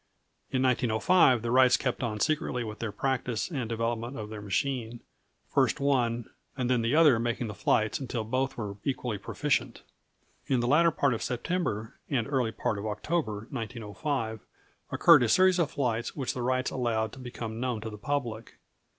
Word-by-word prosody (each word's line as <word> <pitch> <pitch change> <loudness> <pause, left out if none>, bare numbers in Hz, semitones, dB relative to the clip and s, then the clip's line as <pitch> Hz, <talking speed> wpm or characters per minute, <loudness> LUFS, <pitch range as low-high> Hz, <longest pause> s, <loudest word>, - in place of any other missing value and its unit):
In 130 0 0
1905, 125 +2 +3
the 115 - -1
Wrights 130 0 +6
kept 125 - -2
on 110 -4 -2
secretly 135 -2 0
with 105 -1 -7
their 115 -3 -3
practice 125 - -2
and 130 -8 -3
development 115 +2 -2
of 105 -1 -6
their 105 -1 -6
machine, 115 +3 -2 0.5
first - - +2
one 120 -4 +1 0.3
and 125 -1 0
then 125 -2 +3
the 115 +5 +1
other 150 -7 +6
making 120 +1 -1
the 105 - -5
flights 110 +2 +1
until 125 -4 -3
both 130 +4 -1
were 100 -3 -5
equally 125 -6 -2
proficient. 130 +1 -1 0.6
In 130 - +2
the 120 - 0
latter 160 +7 +5
part 140 -4 +1
of 115 - -3
September 120 - -2
and 130 -6 0
early 130 -5 0
part 110 -2 -2
of 105 - -4
October, 110 -2 -2
1905, 115 0 -3 0.5
occurred - - +7
a 120 - +2
series 185 +3 +5
of 165 -4 +2
flights 120 -6 -2
which 135 -4 -2
the 125 - -4
Wrights 130 +1 0
allowed 110 -4 -1
to - - -10
become 115 -3 -6
known 125 -2 -1
to 110 0 -5
the 105 - -8
public. 120 -5 -3
120 Hz, 175 wpm, -29 LUFS, 110-135 Hz, 0.6 s, occurred